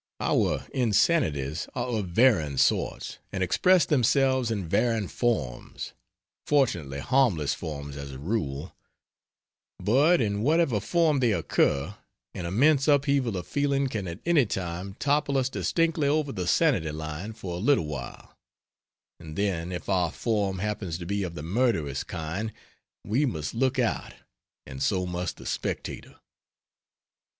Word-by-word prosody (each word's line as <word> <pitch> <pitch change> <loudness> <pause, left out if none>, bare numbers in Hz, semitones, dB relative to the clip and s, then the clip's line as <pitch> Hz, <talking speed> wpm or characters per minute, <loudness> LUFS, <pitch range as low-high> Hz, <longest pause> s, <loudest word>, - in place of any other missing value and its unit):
Our - - +1
insanities 105 - +1
are 120 -1 -1
of 110 -6 -2
varying 85 - +3
sorts, - - 0
and 95 - -1
express 180 - +4
themselves 130 -2 +2
in 100 -6 -2
varying 115 +3 +1
forms 80 - -2 0.5
fortunately 90 - +1
harmless 100 - +2
forms 70 -2 -6
as 70 -1 -7
a - - -7
rule 75 -2 -3 1.0
but 140 - +4
in 105 -3 0
whatever 150 -3 +2
form 160 - +2
they 120 -3 +3
occur 70 -7 +1 0.4
an 85 - -4
immense 140 - +3
upheaval 140 -6 +2
of 90 - -5
feeling 140 -1 0
can 105 -6 -3
at 85 0 -6
any 160 -8 +4
time 95 +1 -4
topple 140 0 +1
us 130 -1 +1
distinctly 165 +1 +1
over 145 -1 +1
the 90 -6 -4
sanity 115 - +3
line 80 +6 -5
for 95 -5 -6
a - - -3
little 120 - +3
while; 70 -5 -7 0.8
and 80 -1 -9
then 90 -3 -1
if 90 - -5
our 90 -4 +1
form 100 -3 -1
happens 100 -4 -3
to 85 - -7
be 100 +3 -1
of 90 -3 -4
the 75 - -6
murderous 85 - 0
kind 90 +6 -4 0.5
we 120 +8 +1
must 80 - -3
look 130 +3 +1
out 120 -3 -1 0.5
and 65 +1 -8
so 90 +4 +1
must 90 0 -3
the - - -12
spectator. - - -4
105 Hz, 140 wpm, -27 LUFS, 85-130 Hz, 1.0 s, express